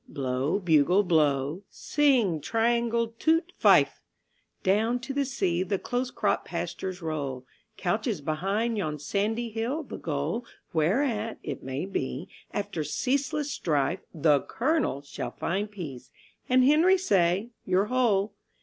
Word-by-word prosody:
(Blow, 135 +4 -1
bugle, 175 +1 +4
blow; 150 -2 +2
sing, 245 - +2
triangle; 235 +3 +1
toot, 330 +3 +2
fife!) - - +5 0.6
Down 220 +5 +2
to 260 +2 -5
the 280 0 +1
sea 190 -10 0
the 190 +1 0
close 245 +5 -2
cropped - - 0
pastures 185 -1 -4
roll, 140 -5 -3 0.3
Couches 205 +2 -1
behind 195 +10 -1
yon 155 -5 -2
sandy 220 +9 -1
hill 235 +8 -2
the - - -8
goal 155 +8 -2 0.3
Whereat, 215 - +1
it - - -5
may 130 +5 -3
be, 165 -3 -3 0.2
after 185 -6 -3
ceaseless 280 - -1
strife 155 +2 0
The 150 -3 +3
"Colonel" 265 - 0
shall 140 - -5
find 200 +4 -2
peace, 160 -12 -8 0.4
and 255 0 +5
Henry 325 +7 +5
say, 195 - +2 0.2
"Your 185 +2 +3
hole" 220 -4 +1
195 Hz, 130 wpm, -27 LUFS, 155-240 Hz, 0.6 s, fife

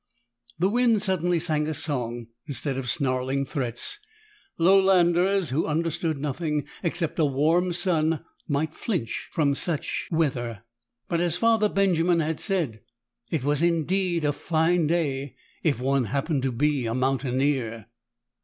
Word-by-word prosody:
The 180 +4 +2
wind 230 -1 +2
suddenly 180 -3 +1
sang 155 -2 0
a 155 - -2
song 120 -6 -2 0.2
instead 140 0 -2
of 130 -2 -3
snarling 135 -1 0
threats. 135 - -3 0.6
Lowlanders 185 0 +4
who 150 +5 0
understood 160 0 -1
nothing 150 +1 -2 0.2
except 170 -2 -1
a 155 - +4
warm 160 +6 +2
sun 165 -3 0 0.2
might 155 +1 -1
flinch 175 - -3
from 145 -3 +2
such 155 +2 -2
weather. 125 - -1 0.4
But, 170 0 0
as 175 -2 0
Father 225 -2 +3
Benjamin 180 -4 +2
had 160 -1 -1
said, 155 - -1 0.5
it 155 -6 -1
was 145 +1 +1
indeed 170 0 +1
a 145 - +2
fine 160 +2 +1
day 145 -5 -1 0.3
if 150 -6 +1
one 135 0 +1
happened 140 - -1
to 130 0 0
be 135 0 0
a 115 - -2
mountaineer. 130 -3 0
155 Hz, 135 wpm, -25 LUFS, 135-175 Hz, 0.6 s, Lowlanders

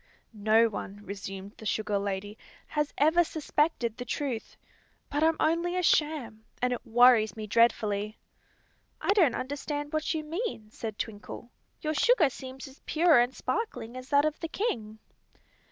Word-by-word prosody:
"No 220 +2 +4
one," 205 -1 -6
resumed 195 0 -7
the 220 - -11
sugar 210 -2 0
lady, 200 +1 -3 0.3
"has 300 -1 -1
ever 320 +4 +5
suspected 300 -7 0
the 245 - -4
truth; 250 -3 -4 0.5
but 290 - 0
I'm 320 0 +3
only 340 +3 +1
a 365 - 0
sham, 295 -10 +1 0.2
and 250 0 +1
it 245 - -5
worries 235 -3 +5
me 215 - -4
dreadfully." 215 -1 +2 0.8
"I - - +2
don't 345 - +4
understand 290 +2 -4
what 310 0 0
you 310 - -2
mean," 310 - -4
said 220 -2 -6
Twinkle. 220 +3 -7 0.3
"Your 310 0 -1
sugar 350 - +4
seems 260 +2 -8
as 270 +1 -15
pure 320 -4 +5
and 245 +2 +1
sparkling 245 - -3
as 255 +1 -8
that 285 +1 +4
of 310 0 -1
the 330 - -3
king." 225 - -3
255 Hz, 155 wpm, -29 LUFS, 220-310 Hz, 0.8 s, ever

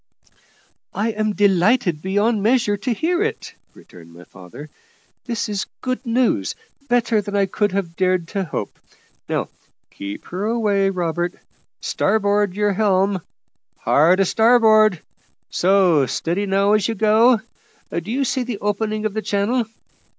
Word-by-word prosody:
"I 215 +3 0
am 215 -1 -1
delighted 190 -3 +2
beyond 205 +4 0
measure 225 -1 +2
to 205 +5 -3
hear 340 - 0
it," 450 +1 -3 0.2
returned 85 -1 -16
my 85 +1 -14
father; 100 - -12 0.5
"this 235 -3 -2
is 205 -1 -3
good 255 0 -3
news, 230 - +1 0.3
better 235 -3 +2
than 205 0 -6
I 200 -1 +3
could 205 +2 -1
have 185 -4 -3
dared 185 -2 0
to 195 -2 -2
hope. 150 - -5 0.5
Now - - -2 0.4
keep 100 0 -8
her 185 +4 -3
away, 210 -4 +1
Robert. 175 -1 -2 0.5
Starboard 205 -2 +1
your 205 0 +1
helm 195 -2 +1 0.6
hard 170 +6 +3
a 195 - +4
starboard; 220 -3 +4 0.5
so, 180 -7 +3
steady 180 +9 -2
now 195 +1 +2
as 210 -2 +2
you 230 - -2
go. 220 +3 +4 0.5
Do 170 +4 -4
you 270 +3 0
see 260 +1 -1
the 245 -3 -4
opening 215 +1 -2
of 215 - -1
the 220 - -2
channel? 215 +5 0
205 Hz, 145 wpm, -20 LUFS, 185-220 Hz, 0.6 s, a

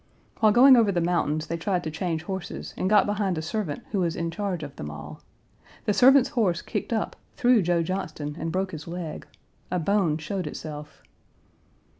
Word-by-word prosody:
While 215 -1 +5
going 260 +4 +8
over 225 -4 +4
the 180 - 0
mountains 165 -3 0
they 170 +1 -3
tried 180 +1 -1
to 155 - -4
change 160 0 -2
horses 190 +1 -6
and 185 - -1
got 210 -2 +5
behind 205 -4 -1
a - - -1
servant 165 -3 -3
who 200 - 0
was 170 -3 0
in 170 0 -2
charge 190 -4 -3
of 145 -2 -8
them 75 - -6
all. 75 +1 -9 0.6
The 210 - +2
servant's 265 +5 +6
horse 210 - 0
kicked - - -4
up, 220 -2 -1 0.2
threw 245 -4 +4
Joe 175 -1 +1
Johnston, 160 -5 -4
and 165 0 -3
broke 190 +1 -1
his 155 -1 -8
leg; 170 -2 -6 0.4
a 180 - 0
bone 175 -3 +1
showed 175 +2 -4
itself. 150 0 -8
175 Hz, 190 wpm, -26 LUFS, 160-205 Hz, 0.6 s, going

